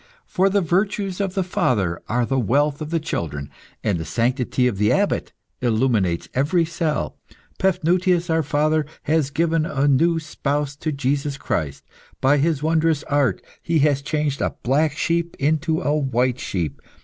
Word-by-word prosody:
For 190 +2 +2
the 200 +1 +2
virtues 195 +2 0
of 195 -2 -2
the 190 - +1
father 100 - 0
are 120 +1 +1
the 135 +2 0
wealth 140 +6 +1
of 155 - -4
the 165 0 0
children, 75 - -4 0.3
and 100 -6 0
the - - -3
sanctity 125 - 0
of 115 -6 0
the 105 0 +3
Abbot - - +1 0.3
illuminates 110 -7 +1
every 160 +6 +2
cell. 165 -2 -2 0.4
Paphnutius, 180 -1 +2
our 160 -1 +2
father, 150 +1 +1 0.2
has 155 -2 +1
given 165 +2 +1
a 140 -3 0
new 165 +4 +3
spouse 145 -2 -2
to 155 +1 -2
Jesus 140 0 -1
Christ. 75 - -3 0.4
By 140 +2 +4
his 150 -1 +1
wondrous 160 -1 +2
art, 140 -9 +1 0.2
he 165 -1 0
has 140 -2 +2
changed 145 -1 -1
a - - -1
black 145 +4 +1
sheep 170 0 0
into 160 +3 +1
a 150 -2 +1
white 130 -3 0
sheep. 85 -6 -3
145 Hz, 160 wpm, -22 LUFS, 130-165 Hz, 0.4 s, By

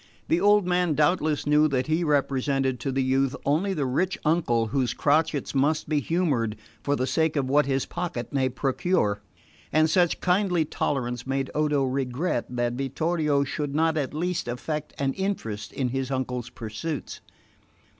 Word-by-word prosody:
The 170 - +2
old 205 -1 +5
man 180 -3 +1
doubtless 155 0 +1
knew 150 +1 +4
that 130 -3 0
he 160 +2 +1
represented 135 -3 +1
to 135 +3 -2
the 135 0 0
youth 130 0 +1
only 160 +8 +1
the 145 -4 0
rich 175 +9 0
uncle 150 -8 +2
whose 125 -1 0
crotchets 150 -1 +1
must 145 +3 +1
be 155 -2 +1
humoured 140 -9 0 0.3
for 145 - 0
the 130 - 0
sake 160 +2 +1
of 140 -3 0
what 145 +2 +3
his 135 -1 0
pocket 165 -10 -4
may 135 -2 +2
procure; 130 - 0 0.5
and 155 0 +4
such 175 -2 +3
kindly 180 -3 +2
tolerance 125 -4 -2
made 135 0 -1
Odo 150 -2 +1
regret 130 +2 -1
that 120 -1 -1
Vittorio 145 +2 0
should 145 +1 -3
not 160 +1 +2
at 145 -4 -1
least 175 +1 -2
affect 150 +6 -4
an 135 -1 0
interest 190 - -3
in 130 -2 -1
his 135 +1 -2
uncle's 125 -2 -3
pursuits. 130 +7 -5
140 Hz, 165 wpm, -26 LUFS, 130-160 Hz, 0.5 s, old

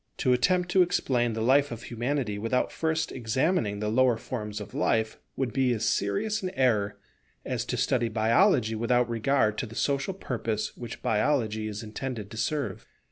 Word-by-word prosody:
To 130 - +2
attempt 180 +8 +2
to 190 - +5
explain 125 -9 +1
the 110 0 -2
life 140 +3 +4
of 115 -1 -6
Humanity 120 -3 -2
without 115 +4 0
first 160 0 -1
examining 120 - 0
the 105 0 -1
lower 125 +1 +3
forms 105 -4 -5
of 105 - -9
life, 110 -1 0 0.2
would 130 -4 -2
be 130 -2 +2
as 110 - -2
serious 155 - 0
an 185 - -2
error 110 -6 +2 0.5
as - - -2
to - - -2
study 120 -2 +1
Biology 115 - +3
without 120 +2 +2
regard 115 -2 +1
to 125 - -2
the 115 - -11
social 140 +9 0
purpose 115 - -3
which 120 -2 -8
Biology 110 -2 +1
is 105 +1 -5
intended 110 -1 -5
to 110 - -8
serve. 130 -6 -2
120 Hz, 175 wpm, -27 LUFS, 110-135 Hz, 0.5 s, to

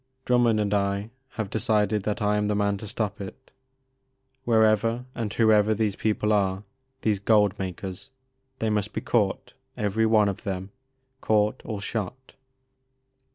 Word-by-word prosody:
Drummond 120 -3 +3
and 105 -1 0
I 100 +1 0 0.2
have 110 -4 -4
decided 110 -2 +1
that 105 0 -1
I 105 0 +2
am 105 0 0
the 105 - 0
man 100 0 +1
to 105 - -8
stop 105 -1 -3
it. 100 +7 -10 0.9
Wherever 115 +1 +3
and 115 -4 -3
whoever 110 -1 +4
these 105 -2 0
people 105 0 0
are 95 -1 +1 0.2
— 130 0 -47
^these 105 -2 0
gold 105 -2 +3
makers, 95 0 -6 0.3
— 130 0 -46
^they 110 -1 0
must 105 0 -1
be - - -3
caught, 105 -5 0 0.2
every 110 0 +1
one 110 -2 +4
of 100 - -3
them, 95 -2 -4 0.2
— 130 0 -47
caught 105 +2 +1
or 105 -3 -5
shot." 115 +5 -5
105 Hz, 160 wpm, -26 LUFS, 100-115 Hz, 0.9 s, whoever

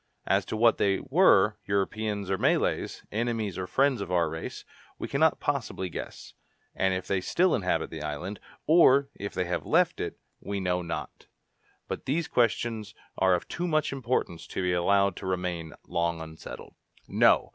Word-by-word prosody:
As - - +2
to 110 - -4
what 115 +1 +4
they 100 -1 +2
were, 130 - +4
Europeans 100 0 -1
or 95 - +1
Malays, - - 0
enemies 110 -3 -1
or 95 -1 -4
friends 130 +4 +2
of 95 - -5
our 85 -3 +2
race, 80 0 -6 0.3
we - - -4
cannot - - +2
possibly 95 -1 -2
guess; - - -8 0.4
and 95 -1 +1
if 95 0 -4
they 95 -1 0
still 180 - +2
inhabit 90 -6 0
the 80 - -6
island, 75 +7 -4 0.3
or 140 -4 +6
if 100 0 -6
they 90 - 0
have 90 - -2
left - - +2
it, - - -4 0.2
we 100 0 -4
know 90 -1 0
not. 85 -1 -6 0.6
But - - -5
these 155 +4 0
questions 115 -2 0 0.2
are 95 -1 +4
of 85 - -4
too 175 +1 -3
much 155 -4 +1
importance 120 -10 -2
to 95 - -3
be 90 0 +1
allowed 100 +2 +3
to - - -6
remain 90 -3 -2
long 85 -1 0
unsettled." 80 0 -9 0.3
"No! - - +4
100 Hz, 170 wpm, -28 LUFS, 90-115 Hz, 0.6 s, or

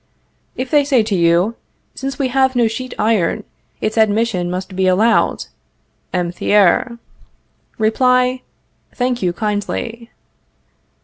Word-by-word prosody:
If 255 0 -5
they 295 -2 +4
say 270 -5 +2
to 210 -2 -1
you: 170 +4 +2 0.4
Since 270 0 -5
we 270 -3 0
have 265 0 +2
no 240 -2 +3
sheet 255 +3 -5
iron, 215 -6 +1 0.4
its 215 +1 -1
admission 215 -4 +1
must 185 +1 -5
be 190 0 +1
allowed 215 +5 +2 0.7
(M. 175 -2 -1
Thiers) 205 +5 +2 0.8
Reply: 250 +3 +2 0.5
Thank 250 -1 -1
you, 180 - +1
kindly. 215 +4 -4
225 Hz, 120 wpm, -18 LUFS, 190-250 Hz, 0.8 s, they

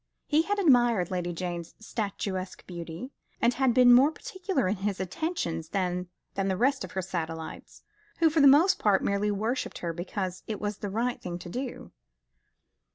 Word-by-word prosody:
He 305 +1 +3
had 410 +5 -1
admired 240 - +4
Lady 175 -1 -1
Jane's 175 -1 -5
statuesque 200 -4 -4
beauty, 175 - -7 0.3
and 235 +1 +3
had 265 -1 +2
been 245 0 +7
more 260 +4 +7
particular 375 - -2
in 195 +3 0
his 195 0 -2
attentions 185 - -3
than 180 -1 -1 0.3
the 195 -1 0
rest 265 +5 +2
of - - -8
her 190 - -2
satellites, 165 -3 -6 0.3
who 325 -2 +4
for 315 -1 +3
the 280 - +8
most 315 +8 +6
part 205 -3 +3
merely 200 +1 +1
worshipped 220 +5 -2
her 170 -1 -3
because 180 +1 -4
it 215 - -3
was 205 -1 -3
the 205 - -4
right 235 +5 -1
thing 175 -1 -4
to 175 - -9
do. 250 +6 -5
205 Hz, 170 wpm, -28 LUFS, 180-255 Hz, 0.3 s, the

